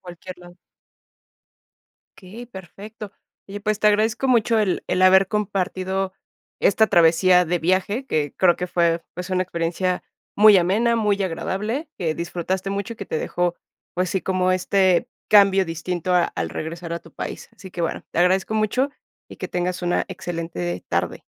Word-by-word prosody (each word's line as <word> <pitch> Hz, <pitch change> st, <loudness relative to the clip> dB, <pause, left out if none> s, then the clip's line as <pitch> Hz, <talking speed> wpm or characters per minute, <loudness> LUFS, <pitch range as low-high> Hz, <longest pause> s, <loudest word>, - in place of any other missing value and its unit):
Cualquier 180 Hz, +1 st, -10 dB
lado. 175 Hz, 0 st, -15 dB, 1.6 s
Okey, 215 Hz, +6 st, -11 dB
perfecto. 205 Hz, +1 st, -10 dB, 0.4 s
Oye, 205 Hz, +1 st, -7 dB
pues 215 Hz, 0 st, -1 dB
te 210 Hz, -, +5 dB
agradezco 220 Hz, +5 st, +1 dB
mucho 230 Hz, -2 st, +3 dB
el 195 Hz, -4 st, -1 dB
el 185 Hz, -, 0 dB
haber 190 Hz, +1 st, +6 dB
compartido 190 Hz, -2 st, -2 dB, 0.5 s
esta 220 Hz, +2 st, +4 dB
travesía 180 Hz, +1 st, +5 dB
de 175 Hz, +1 st, 0 dB
viaje 190 Hz, +9 st, 0 dB
que 150 Hz, -, -1 dB
creo 175 Hz, -2 st, +4 dB
que 180 Hz, +1 st, -4 dB
fue 170 Hz, -1 st, +1 dB
pues 180 Hz, +2 st, -6 dB
una 185 Hz, 0 st, +1 dB
experiencia 180 Hz, +1 st, -2 dB, 0.3 s
muy 210 Hz, 0 st, +8 dB
amena, 205 Hz, +7 st, +2 dB
muy 210 Hz, -3 st, +1 dB
agradable, 210 Hz, -, -3 dB
que 165 Hz, -4 st, -1 dB
disfrutaste 180 Hz, +3 st, -3 dB
mucho 200 Hz, +3 st, -3 dB
y -, -, -12 dB
que 200 Hz, -, -6 dB
te 155 Hz, -, -2 dB
dejó 175 Hz, +1 st, -1 dB, 0.4 s
pues 180 Hz, 0 st, 0 dB
sí 190 Hz, -, 0 dB
como 185 Hz, 0 st, +1 dB
este 185 Hz, +3 st, +2 dB, 0.2 s
cambio 195 Hz, -2 st, +6 dB
distinto 175 Hz, +1 st, -3 dB
a 175 Hz, -, +5 dB
al 80 Hz, -, -4 dB
regresar 165 Hz, -, -6 dB
a 170 Hz, -, -3 dB
tu -, -, -17 dB
país. -, -, -7 dB
Así 190 Hz, -, -11 dB
que 170 Hz, -, -4 dB
bueno, 165 Hz, -, -3 dB
te -, -, -3 dB
agradezco 190 Hz, +4 st, +2 dB
mucho 220 Hz, +6 st, +1 dB, 0.4 s
y -, -, -10 dB
que -, -, -6 dB
tengas 180 Hz, 0 st, -2 dB
una 175 Hz, 0 st, +1 dB
excelente 165 Hz, -, -5 dB
tarde. -, -, -2 dB
185 Hz, 165 wpm, -22 LUFS, 175-205 Hz, 1.6 s, muy